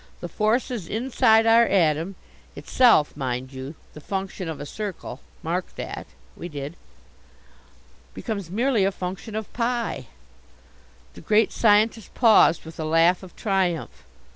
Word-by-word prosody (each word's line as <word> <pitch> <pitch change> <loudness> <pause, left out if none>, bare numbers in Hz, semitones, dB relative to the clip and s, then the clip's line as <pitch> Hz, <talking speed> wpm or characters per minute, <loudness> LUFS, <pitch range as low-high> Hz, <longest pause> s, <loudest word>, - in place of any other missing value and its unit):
The 175 - -5
forces 215 +1 -1
inside 225 -1 +3
our 230 +1 +6
atom 170 0 +1 0.4
itself, 230 - +3
mind 130 -1 -4
you, 135 +4 -7 0.2
the 150 - -11
function 190 0 -4
of 160 - -6
a 145 - -6
circle 185 -7 -6 0.2
mark 175 +3 -3
that - - -6
" - - -30
We 175 - -7
did. 145 +1 -6 1.4
"Becomes 200 -7 -5
merely 230 +2 +1
a 195 - +2
function 190 +3 -6
of 220 -1 -5
pi!" 240 0 -2 1.1
The - - -12
Great 215 0 +3
Scientist 220 0 +2
paused 215 -9 +5
with 160 0 -11
a - - -2
laugh 165 +3 +3
of 185 -2 -13
triumph. 190 -6 -1
190 Hz, 140 wpm, -24 LUFS, 160-220 Hz, 1.4 s, our